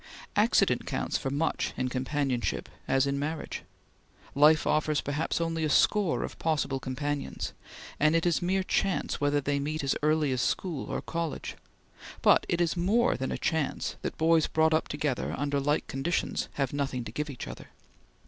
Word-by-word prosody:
Accident - - +3
counts - - -2
for 135 - -1
much 145 +4 -1
in 130 - 0
companionship 130 0 -1 0.2
as 135 0 +3
in 140 0 -1
marriage. 155 +3 -3 0.7
Life 150 +2 +5
offers 155 -1 +2
perhaps 145 +4 -1
only 165 -1 -1
a 155 - +1
score 200 +3 +3
of - - -7
possible 150 -4 0
companions, 140 +2 -3 0.5
and 155 +2 +4
it 165 - +2
is 175 0 +2
mere 190 +2 +1
chance 190 -3 0
whether 145 0 +2
they 140 0 0
meet 150 +2 -2
as 135 - +1
early 150 -1 +2
as 130 -1 0
school 165 -1 -2
or - - -3
college, 165 -2 -4 0.7
but - - +5
it 170 - +1
is 170 -1 +1
more 205 +8 +2
than 130 +1 -3
a - - -2
chance 160 -3 -1
that - - -4
boys 160 0 +4
brought 160 0 +3
up 160 - +1
together 145 -3 -2
under 145 0 0
like 145 +2 +1
conditions 145 +6 -1
have 135 -2 -1
nothing 135 -3 -2
to 110 - -7
give 150 +5 -3
each 135 - -6
other. - - -9
150 Hz, 175 wpm, -29 LUFS, 140-160 Hz, 0.7 s, Life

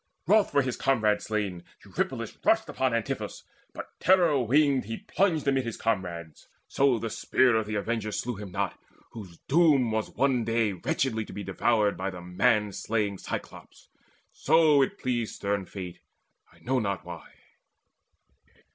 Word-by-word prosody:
Wroth 205 +4 +4
for 140 - +3
his 130 -2 -3
comrade 110 -6 +2
slain, 100 -5 -3 0.2
Eurypylus - - -3
Rushed - - +3
upon 130 -1 0
Antiphus, 115 -2 -4 0.3
but - - -9
terror 175 -6 +4
winged 140 0 +3
He 115 +2 -5
plunged 165 -6 0
amid 135 -1 +2
his 115 -2 -5
comrades; 90 -7 -3 0.2
so 135 -3 +2
the 115 0 -4
spear 125 +2 +2
Of 110 -1 0
the 105 - -3
avenger 110 +1 -2
slew 120 +4 -3
him 100 -2 -8
not, 100 0 -3 0.3
whose 95 -7 -10
doom 145 -6 +4
Was 110 0 -1
one 130 -2 +1
day 115 -2 +1
wretchedly 110 +5 -1
to - - -11
be 105 - -6
devoured 100 +2 +1
By 95 +2 -2
the 90 -2 -8
manslaying 105 +1 0
Cyclops: - - -8 0.4
so 155 -2 +4
it 135 - 0
pleased 120 -3 -2
Stern 100 -2 -2
Fate, 90 -3 -8 0.5
I - - -22
know 130 +1 0
not 100 -6 -3
why. 85 -2 -10
110 Hz, 155 wpm, -27 LUFS, 100-130 Hz, 0.5 s, Wroth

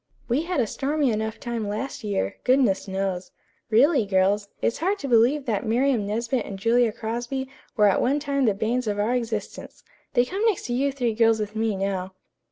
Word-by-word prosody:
"We 250 +5 +1
had 340 -2 -2
a 240 - +3
stormy 280 +3 0
enough 220 0 -3
time 235 -3 -3
last 215 +7 -4
year, 195 - -2
goodness 250 -7 +2
knows. 190 -1 -2 0.4
Really, 260 +4 +4
girls, 200 +1 +1
it - - -3
is 230 - 0
hard 380 +6 +1
to 285 - -5
believe 250 +4 +3
that 215 -6 -1
Miriam 240 -1 +1
Nesbit 230 +3 -1
and 195 - -7
Julia 230 +3 +3
Crosby 240 +4 -4 0.3
were 210 - +5
at 200 - +3
one 275 +4 +2
time 280 -2 0
the 210 -4 +2
banes 235 +4 -1
of 205 -1 -1
our 210 +4 +1
existence. 225 -4 -4 0.3
They 245 0 +4
come 390 - -3
next 435 -5 +1
to 240 - -2
you 275 +3 +1
three 245 -4 -1
girls 225 0 +3
with 210 0 -4
me, 220 -1 0
now." 190 -1 -3
230 Hz, 200 wpm, -24 LUFS, 210-265 Hz, 0.4 s, were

